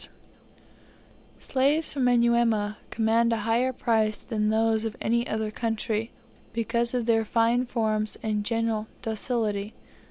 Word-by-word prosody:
Slaves 280 +4 0
from 270 -3 0
Manyuema 235 -3 +2
command 230 +1 +2
a 230 - +1
higher 235 +3 +2
price 220 -4 0
than 215 -3 -1
those 220 0 +2
of 225 -1 -4
any 235 +2 0
other 220 0 -2
country, 225 0 -2 0.4
because 235 +1 -1
of 245 -2 0
their 225 -1 +3
fine 230 +3 +2
forms 215 -3 -1
and 210 -2 -1
general 225 -1 -1 0.2
docility. 220 -2 -2
225 Hz, 125 wpm, -26 LUFS, 215-235 Hz, 0.4 s, their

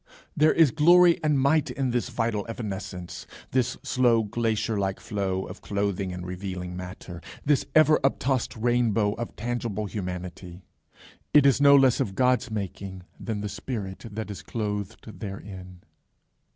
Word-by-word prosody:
There 155 +1 +5
is 160 -6 +5
glory 170 +2 +6
and 150 -2 +2
might 145 +2 +3
in 130 0 -1
this 120 +1 -1
vital 115 -3 -1
evanescence, 95 -5 -6 0.2
this 125 -2 +1
slow 120 -3 +3
glacier 110 0 -1
like 95 -1 -1
flow 95 -3 -2
of 90 - -10
clothing 100 -2 -2
and 90 0 -6
revealing 90 -1 -5
matter, 90 -1 -8 0.2
this 145 -1 +2
ever 155 0 +6
uptossed 135 -3 0
rainbow 115 -3 +2
of 120 +1 -6
tangible 115 -2 -3
humanity. 90 -2 -6 0.7
It 145 -2 +7
is 140 0 +4
no 140 0 +8
less 135 -3 +5
of 95 - -1
God's 125 +1 +2
making 95 -3 -5 0.2
than 110 -3 -3
the 105 - -3
spirit 100 -2 -5
that 105 0 -5
is 100 - -7
clothed 105 -1 -5
therein. 95 -3 -8
110 Hz, 145 wpm, -26 LUFS, 95-125 Hz, 0.7 s, no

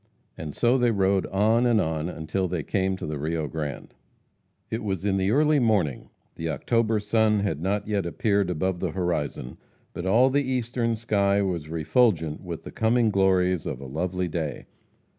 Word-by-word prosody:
And 75 -2 -7
so 125 +2 +3
they 120 -1 +3
rode 95 -3 +1
on 110 +5 +2
and 115 -2 +3
on 80 -1 -1
until 90 +3 -2
they 85 -3 -3
came 95 +2 0
to - - -6
the 75 -1 -4
Rio 80 +1 -2
Grande. 75 -1 -5 0.8
It 110 - -3
was 95 -2 -3
in 100 -1 +1
the 95 0 +1
early 150 +5 +3
morning. 100 - +1 0.3
The 80 0 -3
October 110 - +1
sun 105 0 +2
had 80 -7 -2
not 100 +3 -1
yet 100 -4 -1
appeared 100 +1 +1
above 90 +1 -1
the 90 -4 -2
horizon, 85 -8 -3 0.3
but 85 - -4
all 125 +7 +4
the 145 +2 +2
eastern 120 -2 -1
sky 100 -3 +1
was 85 -5 -3
refulgent 80 -1 +1
with 85 -3 -7
the - - -8
coming 115 -1 +2
glories 95 -3 +2
of - - -4
a 70 - -8
lovely 90 +6 -2
day. 80 -3 -4
95 Hz, 180 wpm, -25 LUFS, 80-110 Hz, 0.8 s, all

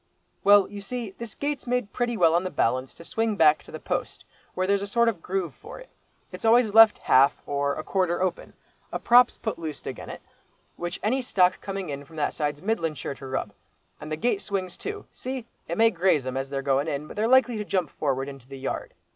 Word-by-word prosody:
"Well, 205 -1 +6
you 205 0 -8
see, 230 +1 -5
this 235 -3 -7
gate's 290 -2 -3
made 250 -4 -1
pretty 240 -2 -1
well 165 -4 +5
on 175 +2 +2
the 185 - -2
balance 130 -3 0
to 170 - -13
swing 225 -1 -1
back 155 -5 +5
to - - -15
the - - -7
post, - - -4 0.3
where 185 - 0
there's 200 +1 +2
a 200 - -4
sort 235 +3 +2
of 205 -8 0
groove 185 -1 -2
for 455 +4 -11
it. - - -13 0.4
It's - - -9
always 225 -1 +4
left 225 -1 +8
half, 135 +2 +4
or 140 0 -1
a 155 - -5
quarter 180 -2 0
open. 185 -1 -2 0.4
A - - -1
prop's 245 +1 +5
put 220 -6 -4
loose 155 -3 -6
agen - - -6
it, - - -9 0.5
which 175 +1 -5
any 255 +5 +1
stock 185 -7 +2
coming 195 -3 -5
in 140 0 -5
from 160 +3 -16
that 150 - -1
side's 150 0 -3
middlin' 170 -7 -1
sure 140 - -5
to 135 0 -10
rub, 130 -6 -3 0.5
and 150 +1 -8
the - - 0
gate 245 - 0
swings 190 -3 -3
to. 415 0 -6
See? 260 -2 -5 0.2
It 170 - -3
may 225 0 +5
graze 175 - +2
'em, 130 0 -4
as 135 0 -3
they're 135 0 -3
going 140 +2 +1
in, 145 -1 -3
but - - -10
they're 215 +2 +1
likely 255 -2 +4
to 210 - -2
jump 185 -5 -1
forward, 135 -2 -1
into 135 -3 -10
the 135 0 -9
yard. 135 0 -5
185 Hz, 230 wpm, -26 LUFS, 145-225 Hz, 0.5 s, left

